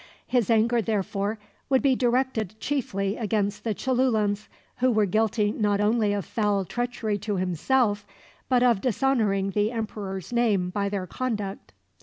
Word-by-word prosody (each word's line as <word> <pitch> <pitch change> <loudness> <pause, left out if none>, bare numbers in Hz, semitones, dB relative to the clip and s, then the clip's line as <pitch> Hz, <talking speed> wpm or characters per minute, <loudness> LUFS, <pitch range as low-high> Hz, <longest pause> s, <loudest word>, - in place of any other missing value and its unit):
His 245 -4 +1
anger 230 +1 +3
therefore 205 0 -1 0.3
would 265 -1 +3
be 270 -2 +4
directed 240 -5 0
chiefly 200 -8 -2
against 210 -3 -1
the 220 -3 -1
Cholulans, 220 -6 +1 0.3
who 255 +1 +3
were 215 -2 +3
guilty 215 +1 +1
not 205 -2 0
only 210 0 +2
of 200 -4 -2
foul 205 -1 0
treachery 235 -1 -2
to 210 0 -2
himself, 205 - +1 0.5
but 250 -2 +4
of 235 -6 +3
dishonoring 220 -6 +1
the 210 +2 +1
emperor's 210 -4 -5
name 205 -7 +2
by 200 +1 -1
their 195 -2 -3
conduct. 210 -2 -4
215 Hz, 145 wpm, -26 LUFS, 200-240 Hz, 0.5 s, be